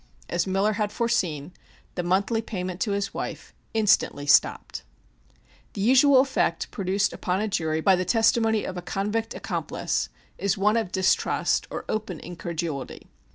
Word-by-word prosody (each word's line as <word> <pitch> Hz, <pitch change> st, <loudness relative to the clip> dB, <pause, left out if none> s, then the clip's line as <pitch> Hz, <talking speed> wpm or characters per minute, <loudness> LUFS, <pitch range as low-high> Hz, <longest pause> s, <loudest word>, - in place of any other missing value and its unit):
As 175 Hz, -, 0 dB
Miller 195 Hz, +3 st, +1 dB
had 210 Hz, -1 st, -1 dB
foreseen, 180 Hz, -11 st, -1 dB, 0.4 s
the 180 Hz, -, -2 dB
monthly 195 Hz, +6 st, +1 dB
payment 185 Hz, -4 st, -5 dB
to 205 Hz, -, 0 dB
his 200 Hz, 0 st, -2 dB
wife -, -, -6 dB, 0.2 s
instantly 210 Hz, -9 st, +2 dB
stopped. 145 Hz, 0 st, +2 dB, 0.9 s
The 200 Hz, -, -4 dB
usual 260 Hz, +4 st, +6 dB
effect 260 Hz, -11 st, -1 dB
produced 195 Hz, +1 st, 0 dB
upon 185 Hz, -1 st, -1 dB
a 215 Hz, -, 0 dB
jury 160 Hz, -6 st, -1 dB
by 190 Hz, +3 st, +5 dB
the 185 Hz, -, -1 dB
testimony 225 Hz, +2 st, +2 dB
of 185 Hz, -, -5 dB
a -, -, -4 dB
convict 210 Hz, +5 st, -2 dB
accomplice -, -, -2 dB, 0.3 s
is 200 Hz, +1 st, 0 dB
one 210 Hz, +3 st, +3 dB
of 220 Hz, -5 st, -1 dB
distrust 190 Hz, -1 st, +1 dB
or -, -, -6 dB
open 215 Hz, -6 st, -3 dB
incredulity. 165 Hz, -5 st, -5 dB
195 Hz, 150 wpm, -25 LUFS, 180-220 Hz, 0.9 s, usual